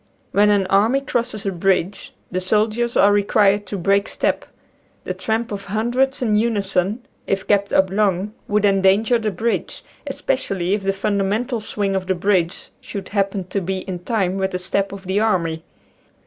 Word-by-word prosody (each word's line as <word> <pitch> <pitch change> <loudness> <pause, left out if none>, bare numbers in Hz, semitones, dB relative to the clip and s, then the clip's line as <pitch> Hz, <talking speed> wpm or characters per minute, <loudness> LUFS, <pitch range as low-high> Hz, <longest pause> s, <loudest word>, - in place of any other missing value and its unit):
When 205 +1 +4
an 200 -2 +3
army 205 +8 +3
crosses 230 -5 -2
a 195 - 0
bridge 185 +1 0 0.2
the 185 0 -1
soldiers 215 +5 +1
are 205 - +6
required 205 0 +3
to 200 - -4
break 200 +3 +2
step. - - -1 0.6
The - - -3
tramp 225 +1 -2
of 200 -1 -5
hundreds 245 +6 0
in 215 -3 +2
unison 210 0 0 0.2
if 195 -1 -1
kept 200 -1 +2
up 190 -1 +3
long 200 0 +1
would 210 0 +2
endanger 200 +4 +3
the 220 -1 -1
bridge, 225 +5 -2 0.2
especially 255 -10 -1
if 205 - 0
the 195 0 +1
fundamental 205 +5 -1
swing 200 -2 -2
of 185 -1 -2
the 190 - +1
bridge 180 -1 0
should 200 - -7
happen 195 -1 0
to 200 - -1
be 190 +1 -3
in 185 -2 -5
time 190 -1 -1
with 190 0 0
the - - 0
step 195 +2 -1
of 195 -1 -8
the 190 +2 0
army. 170 -7 0
200 Hz, 175 wpm, -21 LUFS, 190-215 Hz, 0.6 s, are